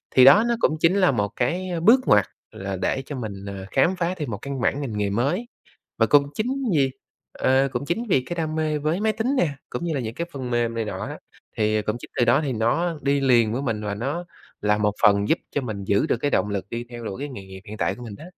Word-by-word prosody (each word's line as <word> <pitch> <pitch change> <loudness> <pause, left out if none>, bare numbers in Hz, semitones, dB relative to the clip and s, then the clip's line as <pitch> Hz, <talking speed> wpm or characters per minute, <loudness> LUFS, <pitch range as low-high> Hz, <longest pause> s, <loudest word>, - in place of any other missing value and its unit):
Thì 130 - +8
đó 145 +11 +8
nó 235 - +2
cũng 155 - +2
chính 165 +4 +4
là 185 -5 +4
một 105 -5 0
cái 175 +10 -1 0.2
bước 235 +7 +7
ngoặt 100 -2 +5 0.3
là 95 0 -5
để 95 +8 -1
cho 145 - -6
mình, 100 -5 -6
à, 100 -1 -6
khám 165 +8 +3
phá 180 0 -1
thêm 145 -7 -4
một 100 - -3
căn 140 -2 -4
bản 140 +4 +1
ngành 115 -7 -4
nghề 105 -1 0
mới. 140 - 0 0.5
Và - - +4
cũng 145 -1 +5
chính 260 +5 -2
vì, 135 -2 +3 0.4
à, 135 +1 +2
cũng - - -2
chính 170 +10 -1
vì 155 -9 +4
cái 175 - -3
đam 160 -2 -2
mê 155 -1 0
với 155 +5 -1
máy 220 0 +2
tính 225 +6 -1
nè, 175 - +3 0.2
cũng 175 - -4
như 165 - -1
là 140 - -1
những 115 -2 -5
cái 170 +5 -3
phần 130 -3 -5
mềm 120 -1 0
này 115 -1 -1
nọ - - -5
á, - - -7 0.4
thì 110 0 +1
cũng 105 +2 -2
chính - - -11
từ 120 - +5
đó 120 +5 +4
thì 135 - -1
nó 150 +9 0
đi 140 0 +2
liền 120 -5 +4
với 130 +4 -2
mình 115 -5 -2
và 100 - -2
nó 140 +11 -3 0.4
là 105 0 +2
một 105 -1 +2
phần 100 -1 +4
giúp - - +3
cho 145 - -1
mình 110 -6 -5
giữ 100 +1 +2
được - - +1
cái 145 +5 -1
động 105 - +1
lực 100 -2 -2
đi 120 +1 -4
theo 120 -1 -8
đuổi 95 - -5
cái 145 - -3
nghề 125 -8 -8
nghiệp 95 0 -10
hiện 110 - -7
tại - - 0
của 125 - -12
mình 115 -4 -7
đó. - - -11
130 Hz, 275 wpm, -24 LUFS, 110-155 Hz, 0.5 s, Thì